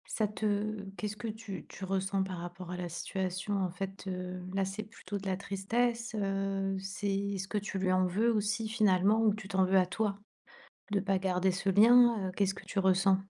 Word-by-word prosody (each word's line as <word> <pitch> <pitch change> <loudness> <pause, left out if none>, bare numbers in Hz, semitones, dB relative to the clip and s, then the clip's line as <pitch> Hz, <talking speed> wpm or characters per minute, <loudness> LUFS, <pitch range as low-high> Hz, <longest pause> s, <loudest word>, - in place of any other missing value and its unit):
Ça 215 - +2
te 210 -1 -1
qu'est-ce 210 +1 -3
que 210 - -6
tu 220 -2 -7
tu 190 - -7
ressens 195 0 0
par 190 -1 -4
rapport 175 +1 -7
à 180 - -3
la 175 -1 -4
situation? 185 +3 -2
En 180 - -1
fait, 195 +2 -6
heu, 180 0 -4
là, 195 -1 +1
c'est 200 +3 -4
plutôt 210 -1 -7
de 195 0 -6
la 190 0 0
tristesse, 230 +4 -1
heu. 195 -1 -1
C'est 195 +1 -4
est-ce 195 -1 -2
que 215 - -3
tu 200 -1 -2
lui 185 -1 +1
en 185 0 +3
veux 215 +6 +2
aussi, 215 +1 0
finalement? 210 0 +3
Ou 215 -2 +5
tu 210 -2 -8
t'en 190 -1 +3
veux 190 +1 +4
à 180 - +4
toi 200 +1 -1 0.7
de 205 - +2
pas 195 -1 0
garder 185 0 +1
ce 195 +1 -2
lien? 230 0 +6
Heu, - - -5
qu'est-ce 195 -1 +1
que - - -11
tu 195 - -1
ressens? 190 0 +3
195 Hz, 210 wpm, -31 LUFS, 190-210 Hz, 0.7 s, lien